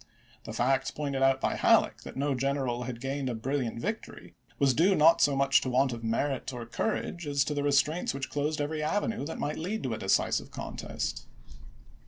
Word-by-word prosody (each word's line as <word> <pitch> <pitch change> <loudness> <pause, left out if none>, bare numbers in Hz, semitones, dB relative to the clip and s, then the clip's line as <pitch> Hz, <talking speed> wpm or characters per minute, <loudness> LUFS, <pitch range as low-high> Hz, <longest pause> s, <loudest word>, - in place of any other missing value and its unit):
The - - -6
fact 130 +2 +1
pointed 140 -3 -2
out 135 0 +4
by - - 0
Halleck, - - +3
that - - -9
no 140 +1 +1
general 130 -2 -1
had 120 -2 -5
gained 135 +1 -2
a 120 - -2
brilliant 120 0 -2
victory, - - -5 0.2
was 140 -2 +3
due 185 +9 +4
not 165 +2 +6
so 140 -1 +4
much 135 0 +4
to 130 - -2
want 130 +1 +2
of 115 -1 -7
merit 130 +5 -1
or 120 -2 -6
courage 175 - -3
as 140 -1 +2
to 150 - -2
the 145 - -1
re 145 - +1
straints 150 +5 +2
which 135 0 -5
closed 150 +2 -1
every 150 +1 -2
avenue 200 +1 -1
that 160 - -5
might 150 - -3
lead 195 +7 -3
to 130 -4 -1
a - - -4
decisive 95 - +1
contest. - - -5
140 Hz, 205 wpm, -29 LUFS, 130-150 Hz, 0.2 s, not